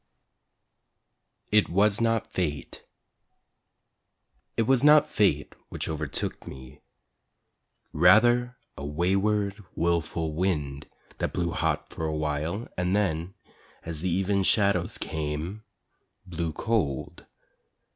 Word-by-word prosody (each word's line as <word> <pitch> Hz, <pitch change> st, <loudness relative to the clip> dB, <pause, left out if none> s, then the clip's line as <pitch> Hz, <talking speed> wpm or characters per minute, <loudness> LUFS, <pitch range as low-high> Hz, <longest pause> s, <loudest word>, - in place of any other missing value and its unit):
IT 105 Hz, -1 st, +4 dB
WAS 100 Hz, +4 st, +3 dB
NOT 115 Hz, -1 st, 0 dB
FATE 75 Hz, -5 st, -3 dB, 1.7 s
It 115 Hz, -, +3 dB
was 130 Hz, +2 st, +3 dB
not 150 Hz, 0 st, +7 dB
fate 90 Hz, -8 st, +1 dB, 0.2 s
which -, -, -5 dB
overtook 75 Hz, -3 st, -4 dB
me, 65 Hz, +2 st, -11 dB, 1.1 s
Rather 120 Hz, +9 st, +4 dB, 0.2 s
a 70 Hz, -, -8 dB
wayward, 100 Hz, +6 st, 0 dB
wilful 85 Hz, -1 st, -1 dB
wind 75 Hz, -5 st, -2 dB, 0.3 s
That -, -, -2 dB
blew -, -, -1 dB
hot -, -, -1 dB
for 80 Hz, -, -4 dB
awhile 75 Hz, +7 st, -2 dB
And 90 Hz, +2 st, 0 dB
then, 90 Hz, -3 st, -1 dB, 0.5 s
as 80 Hz, -2 st, -6 dB
the 90 Hz, -, -1 dB
even 95 Hz, +3 st, +1 dB
shadows 100 Hz, -3 st, +2 dB
came, 80 Hz, +6 st, -4 dB, 0.6 s
blew 85 Hz, -3 st, -3 dB
cold. 90 Hz, -, -2 dB
90 Hz, 100 wpm, -27 LUFS, 80-105 Hz, 1.7 s, not